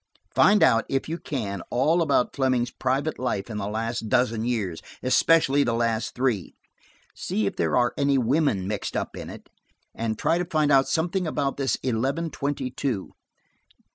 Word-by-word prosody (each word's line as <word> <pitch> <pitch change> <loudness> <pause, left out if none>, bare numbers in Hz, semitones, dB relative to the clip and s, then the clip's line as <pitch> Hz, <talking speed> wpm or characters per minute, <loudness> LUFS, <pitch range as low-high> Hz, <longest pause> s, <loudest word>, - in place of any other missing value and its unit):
Find 210 0 +5
out, 115 0 +4
if 135 - -1
you 165 +2 -4
can, 100 -9 -4
all 155 +8 +2
about 145 -6 +1
Fleming's 130 -3 +1
private 135 +4 -1
life 120 -4 -2
in 105 - -4
the 100 -1 -3
last 115 +1 -3
dozen 115 -2 +1
years, 105 -9 -2 0.2
especially 145 +1 +4
the 115 -3 0
last 115 -1 -1
three. 125 -8 -1 0.6
See 110 - -2
if 100 - -2
there 80 +5 +1
are 120 0 +2
any 140 -1 +2
women 125 - +1
mixed 105 0 -3
up - - -4
in - - -7
it, - - -11 0.5
and 110 -1 -3
try 170 - +1
to 180 - -1
find 155 -3 +1
out 135 -1 +5
something 175 +2 0
about 140 -3 -1
this 135 -1 +1
eleven 135 +7 -1
twenty 140 -2 -3
two." 125 -6 -3
130 Hz, 170 wpm, -25 LUFS, 115-145 Hz, 0.6 s, Find